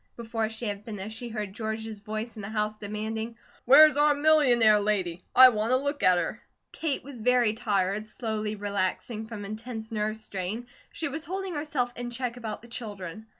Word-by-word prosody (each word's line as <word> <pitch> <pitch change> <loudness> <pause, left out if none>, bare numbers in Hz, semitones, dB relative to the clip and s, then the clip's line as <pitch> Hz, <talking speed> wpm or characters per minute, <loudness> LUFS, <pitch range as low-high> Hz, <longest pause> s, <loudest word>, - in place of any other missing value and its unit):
Before 225 -1 -2
she 225 +2 -6
had 205 -1 -3
finished, 215 -1 -6
she 240 +1 -6
heard 210 -3 -4
George's 220 0 -4
voice 215 +3 -5
in 215 - -7
the 195 - -6
house 215 0 -1
demanding: 220 +2 -4 0.3
"Where's 295 +3 +8
our 295 0 +5
millionaire 260 -8 +5
lady? 190 -4 -1
I 255 0 +11
want 220 +1 0
a - - +6
look 285 +2 -2
at 180 -1 +5
her." - - -2 0.3
Kate 310 -4 -2
was 265 -4 -10
very 245 -2 +4
tired, 210 -2 0
slowly 215 -1 -3
relaxing 205 +2 -2
from 215 -3 -7
intense 220 +1 -6
nerve 215 0 -1
strain, 215 +2 -5 0.3
she 330 - -3
was 300 +2 -5
holding 380 +2 -4
herself 290 -5 -2
in 245 0 -5
check 245 0 -3
about 220 -3 -6
the - - -12
children. 215 -4 -7
220 Hz, 185 wpm, -27 LUFS, 210-245 Hz, 0.3 s, I